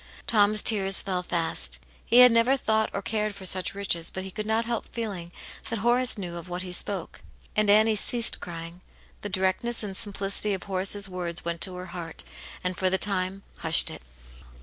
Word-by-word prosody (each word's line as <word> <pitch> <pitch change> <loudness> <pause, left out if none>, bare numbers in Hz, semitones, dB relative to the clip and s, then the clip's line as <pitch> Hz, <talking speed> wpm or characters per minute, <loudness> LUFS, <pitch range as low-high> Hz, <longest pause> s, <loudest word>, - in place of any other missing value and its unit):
Tom's 210 -1 +4
tears 195 -3 +4
fell 185 -3 -2
fast; 160 - -2 0.2
he 240 - +2
had 250 -1 +8
never 230 +4 +3
thought 220 -3 0
or - - -5
cared 215 -1 -2
for 190 - -10
such 185 +1 -1
riches, 170 -4 0
but 190 - -6
he 190 - -8
could 215 +2 -5
not 220 +1 +1
help 235 -1 -3
feeling 195 -7 -5 0.4
that 230 - -2
Horace 240 +3 +2
knew 175 -3 -6
of 170 +1 -10
what 180 +1 -4
he 180 - -7
spoke. 185 -1 -3 0.3
And 215 -1 +2
Annie 215 +1 +5
ceased 235 +2 0
crying; 170 +1 -8 0.4
the 205 - -5
directness 190 +5 0
and 195 -2 -4
simplicity 200 0 0
of 190 - -9
Horace's 200 +1 +1
words 175 -3 -4
went 170 -1 -3
to 185 -2 +2
her 180 0 -7
heart, 170 -2 -6 0.4
and, 180 0 -2
for 185 +1 +1
the 190 - +1
time, 195 -1 -1 0.2
hushed - - +5
it. - - -9
195 Hz, 195 wpm, -26 LUFS, 180-215 Hz, 0.4 s, had